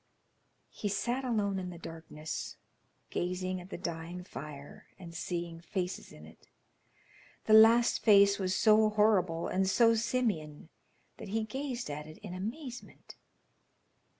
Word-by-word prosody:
He 205 - -3
sat 240 +6 -1
alone 205 -6 0
in 180 -1 -5
the 175 - -8
darkness, 160 -2 -7 0.5
gazing 185 +1 -2
at 180 - -13
the - - -6
dying 170 0 -5
fire, 145 -4 -10
and 170 -3 -10
seeing 170 -1 -4
faces 180 +1 -4
in - - -13
it. - - -17 1.0
The 215 - +3
last 225 +2 +7
face 200 -2 +6
was 190 -1 0
so 215 0 +5
horrible 200 -6 +2
and 190 0 +1
so 230 +2 +5
simian 215 -11 -1 0.5
that - - -8
he 220 +3 -1
gazed 250 - -4
at 150 +1 -6
it 155 - -11
in 195 -4 -7
amazement. 240 +7 -7
190 Hz, 135 wpm, -31 LUFS, 170-220 Hz, 1.0 s, last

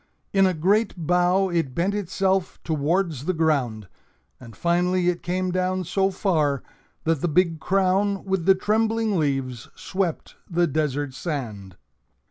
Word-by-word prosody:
In 195 -1 +5
a 185 - 0
great 200 +7 +2
bow 180 +3 +2
it 165 -7 -1
bent 185 +4 +1
itself 190 -1 -1
towards 160 -1 0
the 185 - 0
ground, 135 -10 0 0.5
and 115 -3 -12
finally 175 +1 +1
it 175 -1 -2
came 185 +1 -1
down 185 +1 0
so 195 +3 +1
far 155 -8 0 0.4
that 160 -3 0
the - - +1
big 165 0 +2
crown 195 +2 +1
with 190 -3 -1
the 190 - +7
trembling 220 0 +1
leaves 135 -5 -2
swept 185 -4 -3
the 175 0 +2
desert 145 -3 -1
sand. 110 - -5
175 Hz, 140 wpm, -24 LUFS, 150-190 Hz, 0.5 s, the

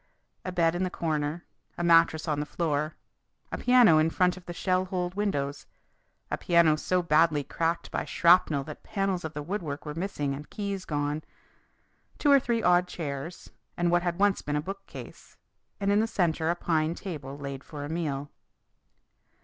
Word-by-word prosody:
A 185 - -4
bed 165 -2 +2
in 175 - -2
the 185 - 0
corner; 155 -1 -2 0.3
a 175 - -2
mattress 165 -1 +4
on 150 -2 0
the 150 - -2
floor; 155 -1 -1 0.6
a - - -2
piano 245 -11 +6
in 155 +1 +3
front 180 +2 +2
of 185 -1 -14
the - - -4
shell 185 +1 0
holed 180 -1 -2
windows, 145 -9 -2 0.6
a - - -1
piano 170 -3 +4
so 180 +3 0
badly 155 -2 +3
cracked 165 +3 -2
by - - -1
shrapnel 170 -5 +4
that 150 +1 -9
panels 195 -3 -2
of 160 -1 -6
the 150 - -4
woodwork 160 -5 -4
were 150 - -4
missing 160 -5 -2
and 145 +2 -8
keys 200 -2 -4
gone; 145 0 -2 0.9
two 290 - +3
or 280 - +8
three 235 -3 -1
odd 180 0 +4
chairs 155 -1 -6 0.3
and 175 0 +1
what 175 0 +4
had 175 -1 -2
once 205 -1 +3
been 145 - -3
a - - +2
bookcase, 195 +4 -9 0.4
and 200 0 +1
in 205 - +4
the 220 - +2
centre 165 -6 0
a 170 - +2
pine 160 -1 0
table 145 -8 -7
laid 140 -1 -6
for 145 -2 -7
a - - -7
meal. 145 -4 -3
170 Hz, 180 wpm, -28 LUFS, 150-185 Hz, 0.9 s, or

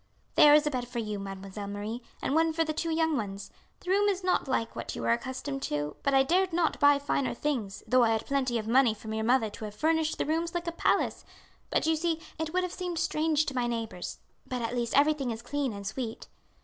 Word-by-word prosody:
"There 295 0 +8
is 300 0 +4
a 300 - +1
bed 250 -2 -2
for 245 0 -7
you, 210 -3 -2
Mademoiselle 195 +1 -6
Marie, 205 +4 -4 0.2
and - - 0
one 325 +1 +3
for 325 +1 +2
the 310 -1 -2
two 330 +2 -2
young 320 -1 +2
ones. 200 -5 -4 0.3
The 365 - -3
room 410 +1 +4
is 385 -2 -1
not 365 -5 +1
like 230 -3 -1
what - - -5
you - - -5
are - - +2
accustomed 260 +3 -2
to, 150 0 -2
but 280 - +1
I 270 -1 +5
dared 365 +6 +2
not 335 -1 +1
buy 285 0 +6
finer 280 -3 -1
things, 235 -9 -2
though 255 0 +4
I 230 - +4
had 220 - -2
plenty 260 -4 0
of 220 -1 -4
money 240 -1 +4
from 220 +1 -7
your 220 0 -1
mother 235 -3 +3
to 215 - -7
have 210 -1 -8
furnished 315 +5 +1
the - - 0
rooms 330 +3 -1
like 345 0 -2
a 335 - -1
palace; 335 - +1 0.5
but - - +1
you 320 0 +3
see 325 0 0 0.2
it 320 -1 -2
would 365 +2 +1
have 360 - -3
seemed 360 -2 -4
strange 315 -2 +1
to 285 - -3
my 245 -1 +1
neighbours; 230 -6 -4 0.3
but, 250 -2 -3
at 230 +2 -2
least, 240 0 0
everything 290 -2 +3
is 230 0 -5
clean 280 +1 -1
and 200 -1 -7
sweet." 225 +2 -5
270 Hz, 245 wpm, -29 LUFS, 225-320 Hz, 0.5 s, There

